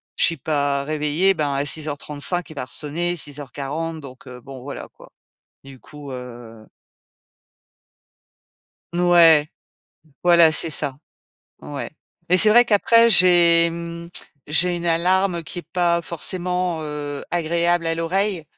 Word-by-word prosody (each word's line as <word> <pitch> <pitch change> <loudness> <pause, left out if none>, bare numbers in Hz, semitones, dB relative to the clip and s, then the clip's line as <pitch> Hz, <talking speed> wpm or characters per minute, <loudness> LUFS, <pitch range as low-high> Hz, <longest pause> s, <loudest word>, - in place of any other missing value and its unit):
je - - +1
suis 165 - 0
pas 140 -1 -1
réveillée, 155 +6 0
ben, 150 -4 -2
à 140 - -1
6:35, 150 +2 -2
il - - -9
va 135 -4 -5
resonner, 165 +6 -3
6:40. 145 +2 -5
Donc, 130 -2 -13
heu, 125 -1 -11
bon, 135 -1 -11
voilà, 140 +2 -8
quoi. - - -18 0.5
Du 135 -1 -14
coup, 145 +1 -12
heu 120 -3 -10 2.3
N 175 - -1
ouais, 165 -4 +5 0.8
voilà, 170 -2 +5
c'est 160 +1 0
ça. 140 -3 -1 0.6
Ouais 145 -2 -7 0.4
et 180 - +5
c'est 215 - +5
vrai, 240 +3 +6
qu'après, 230 +1 +4
j'ai, 170 -3 +5
mmh, 170 0 -7 0.4
j'ai 175 +4 +2
une 170 0 -5
alarme 180 +1 +1
qui 165 +3 -7
est - - -6
pas 170 -1 +2
forcément, 180 +1 -2
heu, 145 -1 -6
agréable 170 0 0
à 165 - 0
l'oreille. 180 +1 -1
165 Hz, 135 wpm, -21 LUFS, 145-175 Hz, 2.3 s, vrai